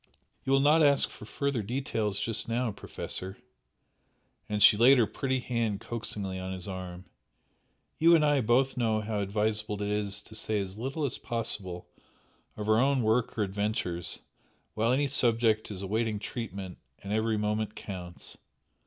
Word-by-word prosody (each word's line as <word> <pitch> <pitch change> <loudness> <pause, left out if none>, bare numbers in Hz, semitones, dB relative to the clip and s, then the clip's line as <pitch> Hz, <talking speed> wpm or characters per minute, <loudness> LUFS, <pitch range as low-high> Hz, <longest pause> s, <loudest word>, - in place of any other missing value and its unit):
You 135 - -2
will 135 0 +5
not 150 +3 +5
ask 140 -2 +4
for - - -11
further 140 +1 -1
details 110 -3 -2
just 115 0 -1
now, 120 0 0
Professor!" 95 -1 -6 1.1
and 105 -1 +1
she - - +9
laid 125 +5 +6
her 120 - +5
pretty 130 +4 -1
hand 115 -5 -1
coaxingly 105 -5 -4
on 95 0 -4
his 95 +1 -5
arm 95 -1 -6 0.9
"You 170 +1 +7
and 155 -2 +4
I 145 -2 +3
both 125 +4 +2
know 110 -3 +1
how 105 -1 -2
advisable 105 +1 -1
it 105 - -2
is 105 0 -2
to 110 - -14
say 110 -1 0
as 100 +1 -4
little 135 +5 -2
as 135 - -3
possible 100 -6 -3 0.7
of 105 0 -4
our 110 0 +4
own 135 -1 +3
work 110 +2 +1
or 110 - +2
adventures, 95 -4 -1 0.6
while 115 +2 +1
any 140 +3 +2
subject 115 -4 +3
is 100 -2 -6
awaiting 110 +2 -1
treatment 100 -4 -6 0.2
and 100 +1 -3
every 110 0 +1
moment 105 0 -1
counts! 90 -3 -8
110 Hz, 160 wpm, -29 LUFS, 100-120 Hz, 1.1 s, she